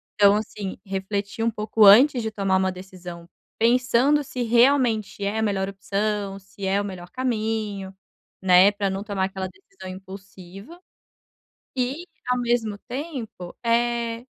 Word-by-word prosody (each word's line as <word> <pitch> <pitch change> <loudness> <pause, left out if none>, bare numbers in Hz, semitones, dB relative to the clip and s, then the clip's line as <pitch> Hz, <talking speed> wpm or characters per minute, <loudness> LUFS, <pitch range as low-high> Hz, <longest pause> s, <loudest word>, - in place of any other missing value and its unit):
Então, 200 0 +6
assim, 205 -2 -4
refletir 200 +2 -3
um 230 - +2
pouco 215 0 +2
antes 245 +5 +7
de 220 - -2
tomar 195 -2 +1
uma 190 0 +1
decisão, 180 -2 -10 0.3
pensando 250 +5 +3
se 255 -2 -6
realmente 235 -4 +2
é 205 +2 -1
a - - 0
melhor 195 -2 0
opção, 200 0 -2
se 195 0 -9
é 195 +1 +1
o - - -3
melhor 180 -3 -8
caminho, 215 -5 -2 0.5
né, 185 +2 +6
para 200 -1 -1
não 190 +1 -3
tomar 200 -3 -1
aquela 190 0 -4
decisão 385 - -14
impulsiva. 195 - -11 1.0
E 265 +7 -2 0.2
ao 250 0 +2
mesmo 235 -4 0
tempo, 250 - -6
eh, 235 0 0
205 Hz, 140 wpm, -24 LUFS, 190-235 Hz, 1.0 s, antes